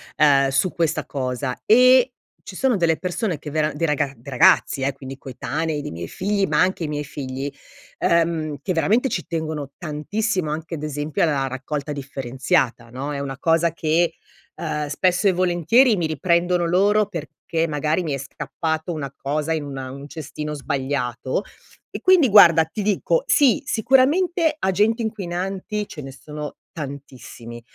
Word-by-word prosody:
ehm, 140 -2 +5
su 135 +7 +1
questa 165 0 0
cosa 130 -1 -3
e 255 +2 +6 0.3
ci 190 - -10
sono 260 +3 +2
delle 165 -3 +2
persone 180 -1 -2
che 150 +1 -8
vera 155 0 +1
dei 165 - -1
raga 150 -2 +1
dei 120 +5 -11
ragazzi, 130 +1 +4
eh, 135 +1 0
quindi 135 0 -9
coetanei, 145 +4 -3
dei - - -5
miei 85 +1 -6
figli 200 - -1
ma - - +1
anche 180 -3 +1
i - - -3
miei 150 0 -3
figli, 135 -1 -5 0.5
uhm, 165 -3 +1
che 185 - -1
veramente 220 +10 +2
ci 180 -6 -3
tengono 155 -4 -4
tantissimo 180 +3 -2
anche 160 +2 -5
ad 150 - -4
esempio 150 0 -3
alla 145 -5 +2
raccolta 140 +3 -4
differenziata, 135 -2 -1
no, 135 +5 -5
è 140 - -3
una 135 -1 -5
cosa 165 +2 +2
che, 165 +1 +1 0.4
uhm, 150 -2 -3
spesso 180 +5 +1
e - - +6
volentieri 185 - +3
mi 165 - 0
riprendono 170 +3 +1
loro 200 +5 +3
perché 165 -2 -3
magari 155 +3 0
mi 155 -4 -2
è - - -1
scappato 160 +4 -4
una 140 -4 -5
cosa 150 +4 -2
in 155 -2 -2
una 135 -2 -6
in 130 - -8
un 140 +1 -9
cestino 150 0 -6
sbagliato. 135 -1 -2 0.5
E - - -5
quindi 365 -8 +5
guarda, 170 -6 +8
ti 180 +7 -5
dico, 215 - +1
sì, 280 -4 +4
sicuramente 300 - +2
agenti 210 +4 +2
inquinanti 195 0 -3
ce 150 - -8
ne 135 - -8
sono 150 +2 -8
tantissimi, 130 -5 -9
155 Hz, 165 wpm, -22 LUFS, 140-185 Hz, 0.5 s, guarda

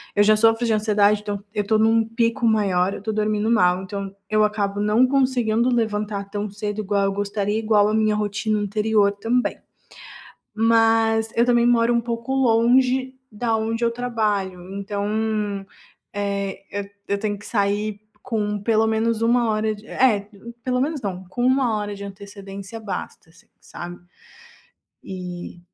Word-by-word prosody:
eu 205 - +4
já 215 +1 +5
sofro 225 +2 +3
de 225 - +2
ansiedade, 210 -1 +3
então 205 -1 -4
eu 205 - -1
tô 220 +2 +2
em - - +4
um 225 0 +3
pico 230 +1 0
maior, 195 -4 +2
eu - - -7
tô 220 - -2
dormindo 215 0 0
mal 180 -5 +3
então 195 0 -6 0.2
eu 215 0 +3
acabo 205 -1 0
não 215 +5 +4
conseguindo 250 -3 +2
levantar 210 -3 -1
tão 205 0 -3
cedo, 210 +1 -4
igual 200 -1 0
eu 195 - 0
gostaria, 205 +1 -1
igual 215 -2 +3
a - - -1
minha 215 -1 +2
rotina 210 +1 -1
anterior 210 0 +2
também. 230 +5 -1 1.0
Mas 225 0 +3
eu 235 - +5
também 240 -1 +3
moro 240 0 +3
um 235 - +2
pouco 235 +2 -3
longe 255 +1 +3 0.2
da 225 +1 -1
onde 225 +1 -1
eu 235 - +2
trabalho 215 -6 -2
então, 205 0 -2 0.5
eh, 200 -1 -3
eu 200 0 -3 0.2
eu 200 - +1
tenho 205 -1 -2
que 205 - -13
sair 205 -1 -1 0.2
com 210 -4 -2
pelo 225 +1 +2
menos 220 0 0
1 235 0 +3
hora 215 0 0
de 210 +1 -15
é 210 -6 +2 0.4
pelo 250 0 0
menos 300 +2 -1
não, 190 -4 -4
com 245 +6 -3
1 255 -3 +2
hora 205 0 -4
de 200 - -8
antecedência 200 +1 -9
basta, 200 -5 -6
assim, 165 - -22 0.2
sabe. 175 0 -9 1.1
E 180 -2 -7
215 Hz, 165 wpm, -22 LUFS, 200-230 Hz, 1.1 s, já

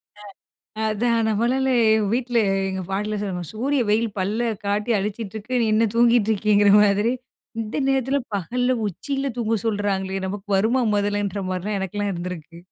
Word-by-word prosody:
அ 210 - -16 0.7
அதான். 230 +2 +1
நம்மளால 245 +5 +1 0.4
வீட்ல 245 -1 0 0.3
எங்க 190 0 -3
பாட்டிலாம் 210 +1 -2
சொல்வாங்க 180 -4 -4
சூரிய 265 +5 0
வெயில் 220 +2 +2
பல்ல 220 +5 0 0.2
காட்டி 205 +3 0
அடிச்சிட்டு 210 +1 -4
இருக்கு. 220 +4 -6
நீ - - +2
என்ன 225 +1 +3
தூங்கிட்டு 235 -2 +4
இருக்கீங்கிற 205 0 +3
மாதிரி 205 +3 +2 0.5
இந்த 215 +4 -5
நேரத்தில 270 +1 +1 0.2
பகல்ல 245 +7 -1 0.2
உச்சியில 275 - -3
தூங்க 225 -1 0
சொல்றாங்களே! 195 -3 -1
நமக்கு 200 +2 -6
வருமா 230 +6 +2
முதலன்ற 205 -1 -1
மாரிலாம் 190 +3 -2
எனக்குலாம் 200 +2 -2
இருந்திருக்கு. 170 -2 -7
210 Hz, 140 wpm, -23 LUFS, 200-235 Hz, 0.7 s, தூங்கிட்டு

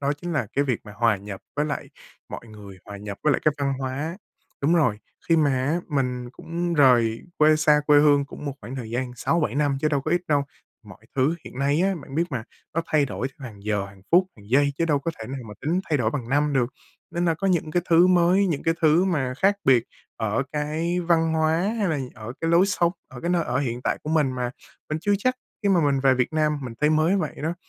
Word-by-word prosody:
đó 140 0 +1
chính 175 +4 -6
là 150 - 0
cái 140 - +1
việc 125 -5 -1
mà 105 - -10
hòa 115 -1 +3
nhập 100 0 -8 0.2
với 150 - +1
lại 150 -2 -4 0.4
mọi - - -8
người, 105 -3 -12
hòa 100 - -8
nhập 100 0 -7
với 150 - +3
lại - - 0
cái 155 - +3
văn 140 -1 0
hóa 140 +6 -3 0.4
đúng 150 +5 +3
rồi, 125 -11 +2 0.3
khi 165 - +5
mà 150 -3 +3 0.2
á, 155 +4 +1
mình 125 -4 -2
cũng 170 +3 -3
rời 120 -6 +4 0.2
quê 155 0 +5
xa 150 -1 +4
quê 145 -1 +6
hương 145 -1 +4
cũng 145 - -10
một 140 - -2
khoảng 130 - -7
thời 120 -4 -6
gian 125 +1 -2
6-7 160 +6 0
năm 145 -2 +1
chứ 155 - +2
đâu 145 -2 +1
có 155 - -4
ít 175 +1 +2
đâu, 145 -2 +2 0.4
mọi 105 +2 -15
thứ 140 +5 +2
hiện - - -10
nay 140 +3 +2
á, 195 +1 +2
bạn 135 - -11
biết 165 +3 +2
mà, 125 -5 -3 0.3
nó 165 - +1
thay 150 -2 +2
đổi 130 - -3
hàng 115 -8 -10
giờ, 105 -2 -1
hàng 100 -1 -16
phút, 180 +2 +6
hàng 100 -1 -16
giây 140 +2 +3
chứ 165 - +2
đâu 150 -3 +2
có 155 +4 -3
thể 110 - -5
nào 135 +1 -5
mà 105 - -9
tính 165 +5 0
thay 150 - +3
đổi 110 -3 +1
bằng 120 -3 -4
năm 145 +2 +2
được. 130 -3 +2 0.4
Nên 175 +1 -1
là 165 -2 +2
có 195 - -3
những 170 -4 +1
cái 175 +3 +1
thứ 170 +2 +7
mới, 185 +2 +4
những 160 -6 -1
cái 165 - +1
thứ 160 +3 +4
mà 140 -9 0
khác 200 +1 +3
biệt 125 -3 +5 0.3
ở 110 +1 0
cái 155 +4 -1
văn 165 -2 +2
hóa 160 0 +2 0.2
hay 205 -3 +1
là 155 -3 0 0.2
ở 110 +2 -7
cái 165 - 0
lối 170 +3 +5
sống, 175 -4 +1 0.2
ở 125 - -10
cái 170 - -2
nơi 175 -2 +2
ở 125 -2 -1
hiện 125 -3 -2
tại - - 0
của 155 - -4
mình 150 -5 +2
mà 125 -1 -2 0.4
mình 155 - -2
chưa 205 - +1
chắc 255 +5 +1 0.3
khi 205 - +2
mà 185 -3 +4
mình 140 -1 +1
về 135 -1 +4
Việt 130 +5 0
Nam 155 -1 +1
mình 125 -3 -6
thấy 150 +1 +3
mới 155 +5 +3
vậy 160 -6 -2
đó, 160 +3 -1
145 Hz, 255 wpm, -24 LUFS, 125-165 Hz, 0.4 s, thứ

